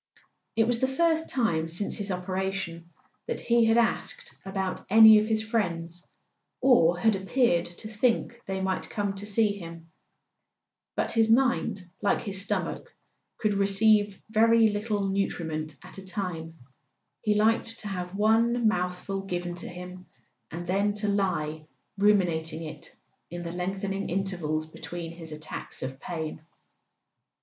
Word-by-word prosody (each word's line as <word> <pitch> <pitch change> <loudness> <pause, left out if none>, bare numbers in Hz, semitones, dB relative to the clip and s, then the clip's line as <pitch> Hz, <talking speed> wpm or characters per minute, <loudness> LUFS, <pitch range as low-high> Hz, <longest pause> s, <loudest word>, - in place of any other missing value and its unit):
It 225 0 +4
was 235 0 +2
the 260 - +2
first 320 +3 +1
time 170 -11 +1
since 175 +5 -1
his 205 -1 -3
operation 185 -2 -3 0.4
that 470 - -2
he 235 -1 +3
had 225 +1 +4
asked 235 -1 0
about 190 -1 -3
any 220 +1 +9
of 215 - -1
his 220 -1 +1
friends, 175 -6 -2 0.6
or 180 -10 +5
had 220 +3 +3
appeared 195 -2 +2
to 175 +5 -8
think 235 +2 0
they 190 0 -2
might 190 -1 -2
come 205 -2 -2
to 200 +1 -6
see 215 0 +3
him. 165 -1 -10 1.0
But - - 0
his 225 -1 +3
mind, 235 -5 +2 0.2
like 205 - +2
his 195 -2 0
stomach, 200 - -2 0.4
could 215 -2 +1
receive 200 0 +3
very 225 0 +5
little 205 -1 -1
nutriment 160 -6 -2
at - - -11
a - - -10
time; 180 -5 -5 0.6
he 215 -2 +1
liked 225 +2 +2
to 210 - -6
have 180 -1 -5
one 225 +3 +3
mouthful 180 0 -1
given 175 -2 -4
to 175 - -4
him, 180 +1 -9 0.4
and 175 +2 -6
then 200 +3 +1
to 210 0 -2
lie 160 -6 -1 0.3
ruminating 170 -6 +2
it 155 -2 -9 0.3
in 175 0 -6
the 170 - -5
lengthening 195 +2 -3
intervals 175 -5 -1
between 165 +1 -7
his 165 -1 -9
attacks 155 0 -6
of 130 +1 -5
pain. 160 -2 -5
195 Hz, 145 wpm, -27 LUFS, 175-220 Hz, 1.0 s, any